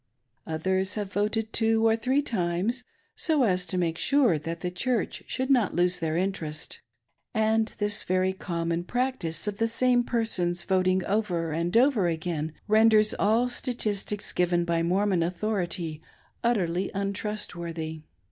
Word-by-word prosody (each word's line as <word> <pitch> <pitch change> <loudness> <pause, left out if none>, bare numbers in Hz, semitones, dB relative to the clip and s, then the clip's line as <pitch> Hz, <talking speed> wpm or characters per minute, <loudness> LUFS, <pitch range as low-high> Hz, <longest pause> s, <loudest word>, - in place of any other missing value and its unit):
Others 190 +4 0
have 205 -2 -4
voted 215 +2 -1
two 225 0 +2
or 225 0 +4
three 260 +5 +1
times, 200 +3 -1 0.3
so 310 -5 +2
as 180 -5 +1
to 185 - -2
make 165 -2 -1
sure 255 - +3
that 165 +2 -6
the 180 - -2
Church 235 +6 -1
should 260 +1 -1
not 240 -7 +3
lose 180 0 +2
their 160 -1 -1
interest. 170 -5 -3 0.5
And 220 0 +2
this 205 0 +4
very 185 +1 +1
• 190 - -22
common 170 -1 -2
practice 240 -8 -2
of 205 -1 -4
the 225 - +2
same 245 +1 +2
persons 185 -8 0
voting 185 -1 +1
over 180 -6 -1
and 170 +6 0
over 240 -7 +4
again 160 -2 -3
renders 215 0 +5
all 225 +4 +3
statistics 215 -5 -1
given 175 -1 +1
by 170 -1 0
Mormon 185 +1 +1
authority 175 -3 -2 0.4
utterly 190 -6 0
untrustworthy. 175 -6 -4
190 Hz, 145 wpm, -27 LUFS, 170-225 Hz, 0.5 s, renders